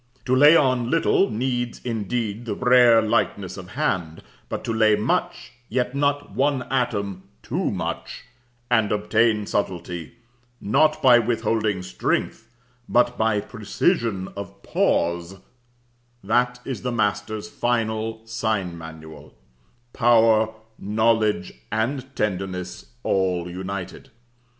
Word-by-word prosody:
To 130 - +2
lay 145 +4 +7
on 130 -6 +2
little 165 +5 +3
needs 120 +1 -2
indeed 115 0 -3
the 110 - -3
rare 125 -2 +5
lightness 105 -4 0
of 90 -2 -9
hand; 90 - -2 0.3
but - - -4
to 115 - -2
lay 110 -1 +4
much, 105 +1 -1 0.2
yet 125 +2 -1
not 145 0 0
one 140 -1 +1
atom 100 -7 -1 0.2
too - - -1
much, - - -5 0.5
and 110 -4 +3
obtain 105 +1 +2
subtlety, 90 -5 -3 0.4
not 155 +8 +2
by 125 -2 +7
withholding 110 -4 0
strength, 90 - -2 0.4
but 120 0 +3
by 110 -2 +1
precision 110 - -1
of 100 -1 -9
pause, 85 +2 0 0.9
that 125 +4 +1
is 130 -6 -4
the 125 - -2
master's 105 -1 -1
final 110 -2 -2
sign 110 -6 -2
manual 80 -1 -11 0.6
power, 115 -2 +4 0.3
knowledge, 110 +1 +1 0.2
and 130 +5 -2
tenderness 95 - -3 0.2
all 90 -2 0
united. 95 +1 -6
110 Hz, 110 wpm, -23 LUFS, 100-120 Hz, 0.9 s, lay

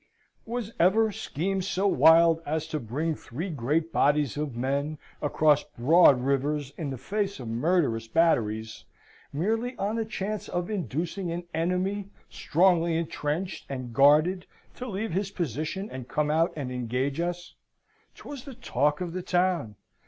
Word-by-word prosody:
Was 230 -1 -4
ever 215 +5 +4
scheme 190 +1 -2
so 190 +1 -1
wild 165 -3 +6
as 155 +1 -2
to 155 - -2
bring 150 +8 -2
three 160 +6 -6
great 155 +4 -1
bodies 145 -2 +2
of 145 -4 -3
men, 140 +4 -1 0.2
across 150 0 +3
broad 140 +1 +5
rivers, 140 +1 0
in 155 -4 -4
the 135 - -4
face 200 - -2
of 125 - -7
murderous 115 -2 +1
batteries, 110 -7 +1 0.5
merely 225 - -1
on 210 +3 -1
the 225 - 0
chance 215 -1 -4
of 175 +3 -2
inducing 175 -1 -3
an 175 +1 -4
enemy, 185 +4 -1 0.2
strongly 170 -1 +2
entrenched 165 +2 -3
and 130 -3 -5
guarded, 155 +8 +4 0.3
to 255 - -7
leave 215 0 -3
his 195 +2 -1
position 170 - -3
and 130 -2 -7
come 150 +2 0
out 165 +2 +2
and 140 -5 -4
engage 125 +4 -2
us? 175 +1 -3 0.6
'Twas 280 -4 -9
the 275 -3 -9
talk 150 - 0
of 175 -2 -3
the 185 - -3
town. 175 - 0
165 Hz, 150 wpm, -27 LUFS, 140-190 Hz, 0.6 s, wild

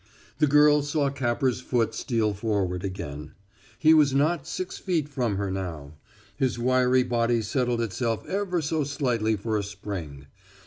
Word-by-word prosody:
The 150 - +4
girl 150 +1 +5
saw 145 -1 0
Capper's 125 -1 0
foot 120 -3 0
steal 115 -5 0
forward 100 -4 -1
again. 85 -7 -6 0.4
He 160 0 +5
was 145 -4 +4
not 150 +1 +1
six 185 +1 -5
feet 170 -6 -1
from 125 -8 -1
her 100 -1 -2
now. 85 -7 -5 0.4
His 130 -3 0
wiry 125 +1 +3
body 120 -1 +1
settled 120 +1 0
itself 115 +1 -2
ever 185 -4 -1
so 155 +1 0
slightly 125 -6 0
for 110 +1 -2
a - - -3
spring. 95 -9 -7
120 Hz, 150 wpm, -26 LUFS, 100-145 Hz, 0.4 s, girl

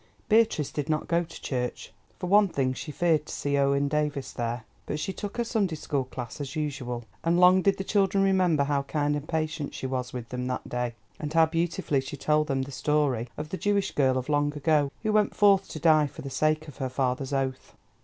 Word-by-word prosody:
Beatrice 220 -10 +3
did 145 -1 -3
not 155 -1 0
go 170 0 +2
to 165 0 -11
church. 125 -2 -3 0.2
For - - -5
one 205 +3 +5
thing, 135 -7 0
she 150 +4 -6
feared 160 -1 +1
to - - -6
see 145 0 -1
Owen 140 0 +2
Davies 145 -2 -1
there. 120 0 -3 0.2
But - - -2
she 190 +4 -3
took 205 +2 -6
her 240 - +1
Sunday 210 -8 0
school 145 -3 -2
class 125 +1 -7
as 140 -1 -5
usual, 140 -6 -3 0.2
and 170 +1 +2
long 180 +1 +7
did 195 +1 +2
the 195 - -3
children 195 -1 +2
remember 185 -6 +3
how 140 0 +1
kind 145 +1 0
and 145 +1 -5
patient 155 -2 -2
she - - -5
was 130 -1 -2
with 120 -2 -6
them 125 0 -3
that 125 - -3
day, 125 -1 -2 0.2
and 150 -1 -4
how 165 0 +5
beautifully 165 -4 0
she 135 +2 -7
told 150 +2 +2
them 135 -3 0
the 140 - -8
story 140 -5 0
of 150 0 -5
the 190 - -3
Jewish 205 0 +1
girl 130 -2 +2
of 130 - -3
long 145 -1 +2
ago, 145 -1 +2
who 215 -1 +1
went 210 -1 +2
forth 200 -2 +5
to 155 - -6
die 155 -2 +5
for - - -10
the 135 - -6
sake 155 +2 +1
of 145 - -11
her 130 -2 -2
father's 130 +1 -1
oath. 135 -1 -2
150 Hz, 225 wpm, -27 LUFS, 135-170 Hz, 0.2 s, long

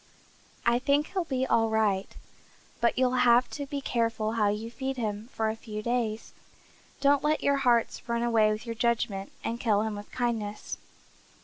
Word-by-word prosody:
I 235 +1 +4
think 285 +3 +1
he'll 370 -3 0
be 260 -3 -1
all 225 -3 +2
right, 210 -3 +1 0.7
but 235 +1 +2
you'll 255 0 +2
have 240 0 +5
to 285 -1 -5
be 280 0 -4
careful 230 -4 0
how 220 -2 +2
you 215 +3 -3
feed 265 +2 -4
him 215 -1 -3
for 220 -1 0
a - - -5
few 215 -1 -7
days. 230 -2 -2 0.7
Don't 280 0 +4
let 305 +1 +1
your 280 0 +3
hearts 240 -2 +1
run 235 0 0
away 225 -3 +3
with 215 +2 -4
your 230 - -3
judgment 225 -4 -1
and 230 +1 -3
kill 215 -3 +2
him 220 -1 -2
with 205 0 -9
kindness." 225 -4 -3
235 Hz, 180 wpm, -28 LUFS, 215-255 Hz, 0.7 s, have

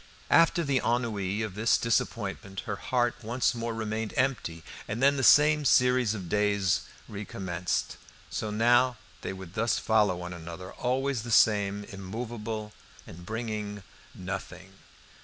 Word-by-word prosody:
After 165 +1 +5
the 140 -4 +1
ennui 110 -4 0
of 110 -3 -4
this 110 +4 +3
disappointment 100 -4 -2
her - - -4
heart 120 -1 0
once 120 +3 0
more 115 -1 -3
remained 110 -1 -3
empty, 100 -12 -1 0.2
and 110 - -3
then 140 +2 +4
the 135 - -1
same 150 +3 +6
series 125 -4 +4
of 95 -4 -6
days 100 -2 +2 0.3
recommenced. 95 -3 -3 0.3
So 110 - -3
now 120 +3 +3 0.2
they - - -4
would 95 -2 -9
thus 115 +2 +1
follow 105 -4 +2
one 90 0 -6
another, 85 +2 -8
always 130 0 -1
the 115 - -7
same, 105 -2 +3
immovable, 105 +2 -6 0.3
and 85 +1 -12
bringing 105 -3 -4 0.3
nothing. 95 0 -7
110 Hz, 140 wpm, -28 LUFS, 95-120 Hz, 0.3 s, same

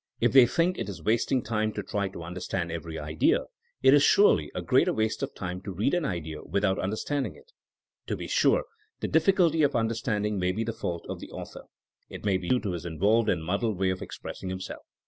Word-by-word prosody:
If - - +3
they 130 -2 +8
thiuk 170 +8 +1
it - - -3
is 95 - -8
wasting 115 +3 +1
time 110 -1 -1
to 105 - -4
try 100 +1 -2
to 95 -3 -8
understand 85 0 -4
every 80 -1 -5
idea, 75 +1 +1 0.4
it 130 0 +7
is 145 - +6
surely 145 - +4
a - - -2
greater - - +3
waste 110 +2 -1
of 140 0 -4
time 90 -1 -5
to 100 - -6
read 100 +9 0
an 175 -3 +1
idea 80 - -4
without 100 -1 0
understanding 110 +9 -2
it. 460 +2 -19 0.6
To - - -2
be - - -6
sure, - - +3 0.4
the - - -1
difficulty 175 -5 +3
of 145 -1 +2
understanding 110 -2 0
may 90 0 +1
be 110 +4 -1
the 115 0 -3
fault 85 -5 -4
of - - -5
the - - -9
author. - - -9 0.4
It - - -9
may 100 -2 +3
be 90 -1 -6
due 125 - +3
to 100 - -2
his 85 -2 -4
involved 100 +7 +2
and 80 -3 0
muddled 100 +4 -1
way 95 0 +1
of 95 - -4
expressing 95 - -7
him 95 0 -4
self. 95 - -7
105 Hz, 225 wpm, -27 LUFS, 90-120 Hz, 0.6 s, they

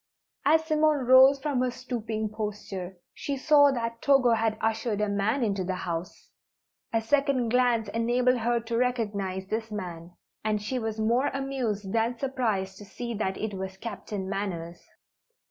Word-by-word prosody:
As 320 +2 +4
Simone 310 -3 +2
rose 260 +2 +7
from 275 -3 -1
her 255 - +1
stooping 230 -4 -4
posture, 205 -4 -5 0.2
she 280 -1 -4
saw 285 +1 +6
that 230 -2 -3
Togo 270 -4 +4
had 225 -1 +1
ushered 225 -1 -1
a 210 - +1
man 205 +6 0
into 200 -4 0
the 185 +1 -2
house. 175 -1 -5 0.6
A 225 - +2
second 270 0 +1
glance 240 -2 +2
enabled 245 +3 +2
her 235 +1 +1
to 230 0 -3
recognize 205 -6 -1
this 220 +3 -3
man, 175 -5 -6 0.3
and 215 -1 0
she 230 +5 -3
was 220 -1 -3
more 235 +5 +2
amused 250 -8 -3
than 230 +1 +1
surprised 220 -8 -2
to - - -9
see 235 +4 -6
that 195 -3 -2
it 215 -1 -3
was 190 0 -5
Captain 205 -2 -5
Manners. 175 -4 -4
225 Hz, 160 wpm, -27 LUFS, 200-250 Hz, 0.6 s, rose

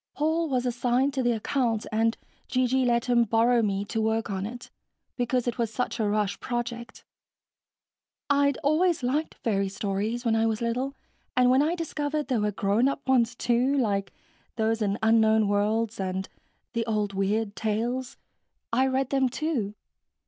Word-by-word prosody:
Paul 320 +2 0
was 255 -2 0
assigned 250 +3 +1
to 270 - 0
the 240 -1 +2
account, 230 -1 -1
and 225 +1 +1 0.3
G.G. 255 0 +1
let 235 -1 +2
him 240 -1 +4
borrow 230 +2 +3
me 200 -2 -1
to 225 +2 -2
work 220 0 0
on 195 +1 -2
it, 240 +1 -9 0.4
because 245 0 0
it 240 - -2
was 230 -2 0
such 250 +1 -2
a 215 -2 +1
rush 205 -1 0
project. 240 -1 -5 1.2
I'd 280 -1 +3
always 310 +1 +2
liked 290 +6 -1
fairy 195 -3 +1
stories 205 +5 -2
when 225 -1 +3
I 225 0 +2
was 220 -1 -1
little 250 +4 -2 0.4
and 250 0 +5
when 260 +2 +5
I 320 +4 +1
discovered 300 -3 -3
there 245 -5 +1
were 210 0 +1
grown 205 +5 +2
up 275 0 -3
ones, 245 -3 +3
too, 245 +4 +1
like 200 -6 0 0.4
those 225 0 0
in 200 -1 0
Unknown 220 -1 +4
Worlds 210 +2 0
and 190 0 -2 0.5
the 230 - 0
old 210 -2 -1
Weird 200 +2 -1
Tales, 240 +5 -2 0.6
I 260 +3 +3
read 265 0 0
them, 270 -2 +2
too. 245 -7 -2
235 Hz, 165 wpm, -27 LUFS, 215-260 Hz, 1.2 s, and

